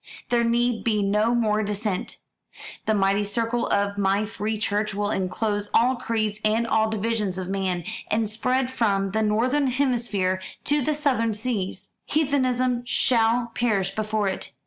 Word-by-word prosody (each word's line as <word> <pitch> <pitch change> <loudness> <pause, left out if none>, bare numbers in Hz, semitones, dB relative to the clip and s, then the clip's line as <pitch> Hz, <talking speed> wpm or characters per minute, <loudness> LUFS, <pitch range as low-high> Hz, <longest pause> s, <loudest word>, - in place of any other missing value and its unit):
There 240 -1 +3
need 235 0 +1
be 210 -3 +1
no 210 +4 +2
more 215 -2 +2
dissent. 205 -2 -3 0.7
The 220 - +3
mighty 200 +1 +2
circle 230 +3 -1
of 200 0 0
my 200 +2 +2
free 215 +1 -3
church 210 -1 -1
will 205 0 -1
enclose 205 +2 -1
all 250 +3 +4
creeds 215 -3 -2
and 220 +2 +2
all 220 -1 +2
divisions 215 -3 -1
of 185 -1 -4
man, 190 -3 -1 0.3
and 220 0 +1
spread 250 +4 0
from 200 -6 +1
the 220 +2 0
northern 250 +7 +2
hemisphere 235 -8 0 0.2
to 295 0 +2
the 300 +3 0
southern 250 -7 +1
seas. 210 -4 -4
Heathenism 255 -5 +1
shall 235 -1 +2
perish 200 -6 0
before 215 0 -1
it. 190 - -4
220 Hz, 150 wpm, -24 LUFS, 205-240 Hz, 0.7 s, all